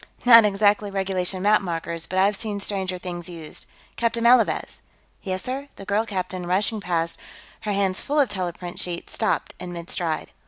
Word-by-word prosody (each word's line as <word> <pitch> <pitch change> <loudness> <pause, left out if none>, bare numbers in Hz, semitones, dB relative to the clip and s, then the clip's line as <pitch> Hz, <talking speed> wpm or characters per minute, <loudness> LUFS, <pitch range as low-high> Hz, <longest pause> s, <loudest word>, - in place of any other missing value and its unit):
"Not 230 -2 +9
exactly 205 0 +3
regulation 190 -1 -1
map 210 +1 +5
markers, 170 -2 -3
but 185 - -3
I've 200 +2 +4
seen 210 -1 -3
stranger 190 -2 -2
things 175 -1 -6
used.... 165 -3 -8 0.3
Captain 230 0 0
Malavez!" 235 -1 +3 0.4
"Yes, 185 -2 -3
sir?" 270 +3 -4
The 195 - -10
girl 210 +3 +1
captain, 185 -3 -3
rushing 205 +4 +1
past, 170 -2 -1 0.4
her 215 -1 -3
hands 195 -2 +1
full 295 +2 0
of 280 - +5
teleprint 180 -2 -4
sheets, 175 -1 -4
stopped 220 - 0
in 180 -1 -6
mid 170 0 -8
stride. 165 -4 -2
190 Hz, 170 wpm, -24 LUFS, 180-210 Hz, 0.4 s, Not